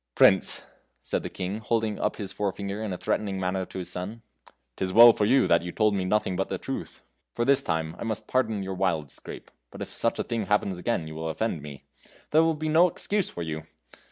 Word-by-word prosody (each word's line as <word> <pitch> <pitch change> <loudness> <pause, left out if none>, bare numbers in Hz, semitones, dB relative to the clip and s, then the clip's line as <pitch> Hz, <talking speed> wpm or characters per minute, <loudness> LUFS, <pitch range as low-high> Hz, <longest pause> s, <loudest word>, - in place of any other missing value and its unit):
"Prince!" - - +5 0.4
said - - -1
the - - -5
King, 95 +3 -4
holding 110 -1 -1
up - - 0
his 100 -3 -5
forefinger 100 +1 -3
in 110 -3 -3
a 90 - -3
threatening 100 -1 -1
manner 95 0 -1
to - - -9
his 90 - -4
son, 105 +6 -5 0.5
"'tis 95 -1 -2
well 115 +3 +9
for 105 - +1
you 130 +5 +4
that 85 - +4
you 90 +1 -5
told 105 +1 +2
me 95 -2 0
nothing 105 -1 +1
but 95 - -1
the - - -2
truth. - - -6 0.3
For 120 - -1
this 140 +1 +4
time 80 -5 -2
I - - -4
must 110 -2 -3
pardon 110 -6 0
your 95 0 -4
wild 85 -7 -1
scrape, - - -9 0.2
but - - -12
if - - -5
such - - 0
a - - -1
thing 115 -4 -3
happens 100 -2 +1
again 90 -4 -1
you 80 - -8
will 80 +1 -4
offend 85 -1 -2
me. 70 -2 -10 0.5
There 155 - +6
will 165 0 +2
be 155 +1 -4
no 165 +3 +5
excuse 200 +2 0
for 85 - -5
you! 80 -1 -4
100 Hz, 230 wpm, -27 LUFS, 90-115 Hz, 0.5 s, well